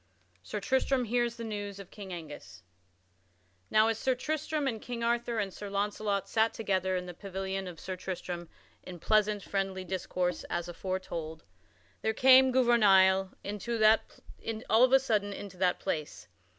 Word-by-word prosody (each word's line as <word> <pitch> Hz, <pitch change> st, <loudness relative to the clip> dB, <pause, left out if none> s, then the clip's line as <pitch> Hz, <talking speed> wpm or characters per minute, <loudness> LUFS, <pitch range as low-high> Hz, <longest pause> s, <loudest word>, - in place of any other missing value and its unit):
[Sidenote: -, -, -32 dB
Sir -, -, -4 dB
Tristram 265 Hz, -1 st, +2 dB
hears 240 Hz, +1 st, 0 dB
news 205 Hz, -3 st, -5 dB
of 195 Hz, -2 st, -11 dB
King 200 Hz, -3 st, -9 dB
Angus] 155 Hz, -, -9 dB, 1.1 s
Now, 215 Hz, +1 st, +5 dB
as 225 Hz, -1 st, 0 dB
Sir 260 Hz, -1 st, +1 dB
Tristram 305 Hz, +2 st, -2 dB
and 225 Hz, -4 st, -2 dB
King 235 Hz, -1 st, -5 dB
Arthur 235 Hz, 0 st, 0 dB
and 200 Hz, -3 st, -2 dB
Sir 205 Hz, -, -7 dB
Launcelot 200 Hz, 0 st, -1 dB
sat 220 Hz, +2 st, +1 dB
together 190 Hz, -3 st, 0 dB
in 180 Hz, 0 st, -2 dB
the 180 Hz, -, -7 dB
pavilion 190 Hz, +1 st, -4 dB
of 170 Hz, -3 st, -9 dB
Sir 185 Hz, 0 st, -5 dB
Tristram 175 Hz, -2 st, -5 dB, 0.3 s
in 180 Hz, -, -9 dB
pleasant, 210 Hz, +1 st, +2 dB
friendly 195 Hz, -1 st, -2 dB
discourse, 180 Hz, -1 st, -2 dB
as 175 Hz, 0 st, -3 dB
aforetold, 170 Hz, -3 st, -5 dB, 0.6 s
there 220 Hz, 0 st, 0 dB
came 260 Hz, +1 st, +7 dB
Gouvernail 195 Hz, -7 st, +4 dB
of 220 Hz, +2 st, +1 dB
a -, -, +7 dB
sudden 210 Hz, -6 st, 0 dB
into 195 Hz, -2 st, -8 dB
that 180 Hz, -1 st, +1 dB
place. 150 Hz, -6 st, -4 dB
205 Hz, 150 wpm, -30 LUFS, 185-230 Hz, 1.1 s, came